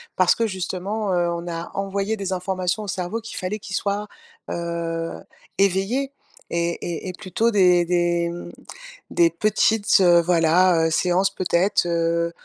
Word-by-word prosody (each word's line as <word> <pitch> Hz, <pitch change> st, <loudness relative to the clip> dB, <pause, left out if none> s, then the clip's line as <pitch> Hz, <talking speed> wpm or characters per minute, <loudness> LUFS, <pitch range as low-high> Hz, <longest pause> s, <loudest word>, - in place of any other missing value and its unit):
parce 185 Hz, -1 st, +4 dB
que, 230 Hz, -, 0 dB
justement, 190 Hz, +2 st, -3 dB
heu, 175 Hz, -1 st, +1 dB
on 170 Hz, 0 st, -4 dB
a 170 Hz, 0 st, -5 dB
envoyé 195 Hz, +2 st, -1 dB
des 195 Hz, -2 st, -4 dB
informations 185 Hz, +2 st, -2 dB
au -, -, -7 dB
cerveau, 185 Hz, +3 st, -3 dB
qu'il 225 Hz, -, -8 dB
fallait 190 Hz, +4 st, -3 dB
qu'il 190 Hz, -2 st, -6 dB
soit, 205 Hz, +2 st, -1 dB, 0.4 s
heu, 170 Hz, -1 st, -3 dB, 0.4 s
éveillé 200 Hz, +9 st, +1 dB, 0.4 s
et 170 Hz, 0 st, -1 dB
et 175 Hz, +2 st, -4 dB
et -, -, -5 dB
plutôt 215 Hz, +4 st, -1 dB
des 180 Hz, -4 st, +4 dB
des, 175 Hz, 0 st, +1 dB
hem, 170 Hz, +1 st, -6 dB, 0.6 s
des 170 Hz, -1 st, +4 dB
petites, 210 Hz, +4 st, +2 dB
heu, 175 Hz, -2 st, +6 dB
voilà, 170 Hz, 0 st, +3 dB
heu, -, -, -2 dB
séances 180 Hz, +4 st, +2 dB
peut-être, 180 Hz, +1 st, +1 dB
heu, 170 Hz, 0 st, 0 dB
180 Hz, 155 wpm, -22 LUFS, 170-200 Hz, 0.6 s, heu